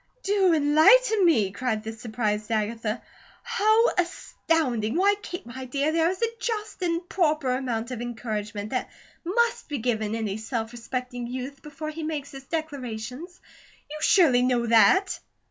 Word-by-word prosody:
"Do 390 Hz, -2 st, +3 dB
enlighten 335 Hz, +9 st, +5 dB
me!" 220 Hz, -, +3 dB
cried 220 Hz, 0 st, -2 dB
the 225 Hz, 0 st, -5 dB
surprised 215 Hz, -2 st, -2 dB
Agatha. 220 Hz, +1 st, -1 dB, 0.4 s
"How 455 Hz, -1 st, +3 dB
astonishing! 310 Hz, -, -1 dB
Why, 395 Hz, +4 st, +4 dB
Kate, 355 Hz, -, -7 dB
my 255 Hz, +2 st, -7 dB
dear, 280 Hz, +4 st, 0 dB
there 330 Hz, +1 st, +2 dB
is 375 Hz, +5 st, -3 dB
a 460 Hz, 0 st, -1 dB
just 440 Hz, -4 st, -3 dB
and 345 Hz, 0 st, -1 dB
proper 305 Hz, -8 st, +1 dB
amount 250 Hz, -2 st, -2 dB
of 240 Hz, -2 st, -4 dB
encouragement 215 Hz, -3 st, -4 dB
that 255 Hz, -, -2 dB, 0.3 s
MUST 465 Hz, +6 st, 0 dB
be 290 Hz, -, -2 dB
given 220 Hz, -3 st, -1 dB
any 215 Hz, -3 st, -2 dB
self 225 Hz, 0 st, -4 dB
respecting 245 Hz, +1 st, -5 dB
youth, 260 Hz, +3 st, -6 dB
before 305 Hz, +1 st, -6 dB
he 320 Hz, +1 st, -7 dB
makes 305 Hz, -3 st, -4 dB
his 270 Hz, -1 st, -10 dB
declarations. 280 Hz, 0 st, -5 dB, 0.5 s
You 305 Hz, -, -5 dB
surely 310 Hz, -8 st, +5 dB
know 250 Hz, -1 st, +2 dB
that." 230 Hz, -, +4 dB
260 Hz, 150 wpm, -26 LUFS, 230-335 Hz, 0.5 s, enlighten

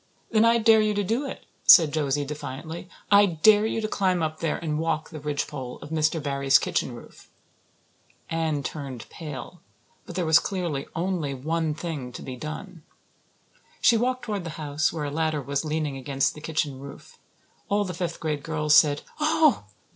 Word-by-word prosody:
"Then 220 Hz, 0 st, +4 dB
I 230 Hz, 0 st, +5 dB
dare 225 Hz, -1 st, +5 dB
you 210 Hz, -1 st, +1 dB
to 205 Hz, -, +1 dB
do 230 Hz, +8 st, -1 dB
it," -, -, -8 dB, 0.2 s
said 160 Hz, -4 st, +8 dB
Josie 145 Hz, -2 st, 0 dB
defiantly. 150 Hz, +4 st, -7 dB, 0.2 s
"I 205 Hz, 0 st, +7 dB
dare 205 Hz, +5 st, +4 dB
you 225 Hz, -, -2 dB
to 215 Hz, -, -1 dB
climb 185 Hz, -5 st, +1 dB
up 155 Hz, 0 st, -3 dB
there 165 Hz, -2 st, -1 dB
and 155 Hz, -2 st, -2 dB
walk 160 Hz, 0 st, -2 dB
the 155 Hz, -, -7 dB
ridgepole 145 Hz, -3 st, -4 dB
of 145 Hz, -, -11 dB
Mr. 160 Hz, +1 st, +1 dB
Barry's 140 Hz, -2 st, +3 dB
kitchen -, -, -2 dB
roof." -, -, -14 dB, 1.0 s
Anne 160 Hz, -3 st, -1 dB
turned 135 Hz, -7 st, -6 dB
pale, 155 Hz, +1 st, -8 dB, 0.5 s
but 175 Hz, -, -8 dB
there 180 Hz, -2 st, 0 dB
was 160 Hz, 0 st, +6 dB
clearly 175 Hz, -8 st, -3 dB
only 165 Hz, -5 st, -1 dB
one 160 Hz, +3 st, -1 dB
thing 150 Hz, -7 st, -5 dB
to -, -, -8 dB
be 130 Hz, -, -6 dB
done. 155 Hz, +6 st, -7 dB, 1.0 s
She 235 Hz, -, +5 dB
walked 255 Hz, +3 st, 0 dB
toward 205 Hz, -4 st, -3 dB
the 165 Hz, -, -5 dB
house, 150 Hz, 0 st, 0 dB
where 155 Hz, -3 st, -4 dB
a 145 Hz, -, -3 dB
ladder 155 Hz, 0 st, 0 dB
was 140 Hz, +2 st, -2 dB
leaning 155 Hz, -2 st, -2 dB
against 135 Hz, 0 st, 0 dB
the 150 Hz, -, -11 dB
kitchen 150 Hz, -3 st, -2 dB
roof. 140 Hz, +1 st, -12 dB, 0.5 s
All 205 Hz, 0 st, +2 dB
the 180 Hz, -, -4 dB
fifth 175 Hz, 0 st, -4 dB
class 155 Hz, -3 st, -2 dB
girls 150 Hz, -1 st, +1 dB
said, 145 Hz, -2 st, +5 dB, 0.2 s
"Oh!" 310 Hz, -, +3 dB
160 Hz, 180 wpm, -25 LUFS, 145-185 Hz, 1.0 s, said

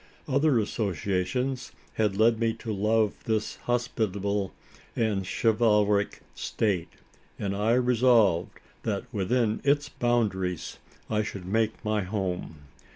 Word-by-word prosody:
Other 140 Hz, -1 st, +3 dB
associations 105 Hz, -, -1 dB, 0.2 s
had 105 Hz, -3 st, 0 dB
led 110 Hz, +1 st, +4 dB
me 115 Hz, -1 st, +1 dB
to 115 Hz, -1 st, -5 dB
love 105 Hz, +1 st, +2 dB
this 110 Hz, -1 st, -1 dB
hospitable 105 Hz, -5 st, -1 dB, 0.4 s
and 105 Hz, -5 st, 0 dB
chivalric 105 Hz, -2 st, +2 dB
state; 100 Hz, -6 st, -1 dB, 0.4 s
and 100 Hz, -1 st, -2 dB
I 105 Hz, +3 st, +2 dB
resolved, 120 Hz, -7 st, +3 dB, 0.2 s
that, -, -, -2 dB
within 110 Hz, +2 st, +1 dB
its 145 Hz, +1 st, +2 dB
boundaries, 100 Hz, -, -1 dB, 0.3 s
I 105 Hz, -1 st, +1 dB
should 100 Hz, -3 st, -6 dB
make 110 Hz, +3 st, 0 dB
my 105 Hz, 0 st, +1 dB
home. 90 Hz, -5 st, -3 dB
110 Hz, 110 wpm, -27 LUFS, 100-120 Hz, 0.4 s, led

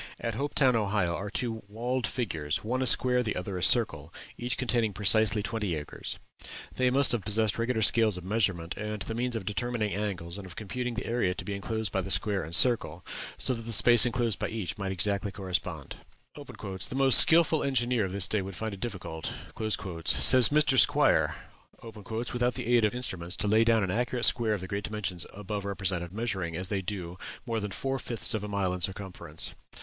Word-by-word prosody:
At 115 Hz, -, -3 dB
Hopetown, 135 Hz, 0 st, +1 dB
Ohio, 100 Hz, -5 st, 0 dB
are 100 Hz, +3 st, -5 dB
two 115 Hz, 0 st, -3 dB
walled 120 Hz, +4 st, -3 dB
figures 80 Hz, -, -3 dB
one 125 Hz, +4 st, -2 dB
a 130 Hz, -, 0 dB
square, 125 Hz, +1 st, +4 dB
the 110 Hz, -4 st, -3 dB
other 90 Hz, +1 st, -5 dB
a 90 Hz, -, -4 dB
circle 85 Hz, -, +3 dB, 0.2 s
each 120 Hz, +1 st, -4 dB
containing 120 Hz, -4 st, 0 dB
precisely 105 Hz, +1 st, +1 dB
twenty 105 Hz, -5 st, -3 dB
acres. 75 Hz, -1 st, -7 dB, 0.6 s
They 130 Hz, -1 st, +1 dB
must 135 Hz, +2 st, +5 dB
have 120 Hz, -, +1 dB
possessed 110 Hz, +3 st, +1 dB
regular 115 Hz, -1 st, 0 dB
scales 110 Hz, -3 st, +3 dB
of 90 Hz, -, -8 dB
measurement, 95 Hz, -4 st, -1 dB
and 105 Hz, -1 st, -4 dB
the 110 Hz, -, -5 dB
means 120 Hz, +1 st, -2 dB
of 110 Hz, -4 st, -5 dB
determining 110 Hz, +1 st, -2 dB
angles 95 Hz, -3 st, -4 dB
and 95 Hz, -, -9 dB
of 85 Hz, -, -12 dB
computing 125 Hz, +3 st, -5 dB
the 115 Hz, -, -5 dB
area 115 Hz, -6 st, -1 dB
to -, -, -7 dB
be 100 Hz, -, -4 dB
enclosed 110 Hz, 0 st, -3 dB
by 95 Hz, -, -1 dB
the 95 Hz, -, -7 dB
square 100 Hz, 0 st, +3 dB
and 80 Hz, -, -7 dB
the 85 Hz, -, +4 dB
circle, 90 Hz, -9 st, +3 dB, 0.3 s
so 130 Hz, -, 0 dB
that 115 Hz, -, -6 dB
the 115 Hz, 0 st, -7 dB
space 120 Hz, +1 st, +7 dB
enclosed 120 Hz, -3 st, 0 dB
by -, -, -2 dB
each 105 Hz, -3 st, -4 dB
might 100 Hz, -3 st, -4 dB
exactly 100 Hz, +2 st, -1 dB
correspond. 90 Hz, -6 st, -4 dB, 0.4 s
"The 95 Hz, +5 st, -7 dB
most 135 Hz, -2 st, +9 dB
skilful 160 Hz, -1 st, +6 dB
engineer 125 Hz, -4 st, 0 dB
of 95 Hz, -, -6 dB
this 100 Hz, -1 st, +3 dB
day 105 Hz, -, 0 dB
would 95 Hz, 0 st, -8 dB
find 110 Hz, +2 st, -5 dB
it 100 Hz, -, -9 dB
difficult," 95 Hz, -7 st, -6 dB, 0.7 s
says 125 Hz, +7 st, +7 dB
Mr. 145 Hz, -3 st, +3 dB
Squier, -, -, +2 dB, 1.0 s
"without 120 Hz, 0 st, 0 dB
the 120 Hz, +1 st, 0 dB
aid 115 Hz, -2 st, +4 dB
of 105 Hz, -, -1 dB
instruments, 95 Hz, -8 st, -4 dB
to 105 Hz, -, -2 dB
lay 110 Hz, +2 st, +4 dB
down 115 Hz, -2 st, +2 dB
an 95 Hz, -, -2 dB
accurate 120 Hz, +3 st, 0 dB
square 115 Hz, -3 st, +3 dB
of 100 Hz, -, -7 dB
the 95 Hz, -, -7 dB
great 100 Hz, +1 st, -4 dB
dimensions 100 Hz, -6 st, -3 dB
above 105 Hz, 0 st, -6 dB
represented, 95 Hz, -3 st, -3 dB
measuring, 95 Hz, -6 st, -4 dB
as 95 Hz, +1 st, -3 dB
they 100 Hz, -2 st, -2 dB
do, 90 Hz, -2 st, -6 dB, 0.3 s
more 115 Hz, -3 st, -2 dB
than 105 Hz, -1 st, -5 dB
four 135 Hz, +5 st, -3 dB
fifths 120 Hz, -2 st, -2 dB
of 110 Hz, -2 st, -3 dB
a -, -, -5 dB
mile 100 Hz, -3 st, -2 dB
in 90 Hz, -, -6 dB
circumference.... 95 Hz, +1 st, -5 dB
105 Hz, 205 wpm, -28 LUFS, 95-120 Hz, 1.0 s, most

